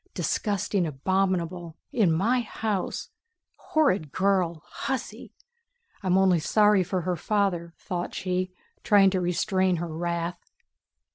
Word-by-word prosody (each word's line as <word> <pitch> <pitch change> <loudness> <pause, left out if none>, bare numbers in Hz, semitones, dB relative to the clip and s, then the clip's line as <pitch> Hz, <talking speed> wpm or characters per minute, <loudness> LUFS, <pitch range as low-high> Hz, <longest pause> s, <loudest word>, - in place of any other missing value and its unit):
"Disgusting, 200 -3 0
abominable... 175 +2 -1 0.2
In 210 -8 +3
my 215 +10 +2
house... 215 -3 -3 0.4
horrid 200 - +1
girl, 185 -4 +1
hussy! 265 -1 -5 0.7
I'm 185 -1 +2
only 190 -3 +4
sorry 210 +3 +4
for 180 +1 -2
her 180 +1 -1
father!" 175 -3 -1
thought 175 -3 -4
she, 185 0 -2 0.3
trying 195 -2 +5
to 185 -1 0
restrain 185 +1 +1
her 165 -1 -4
wrath. 170 +1 -2
185 Hz, 115 wpm, -26 LUFS, 170-200 Hz, 0.7 s, trying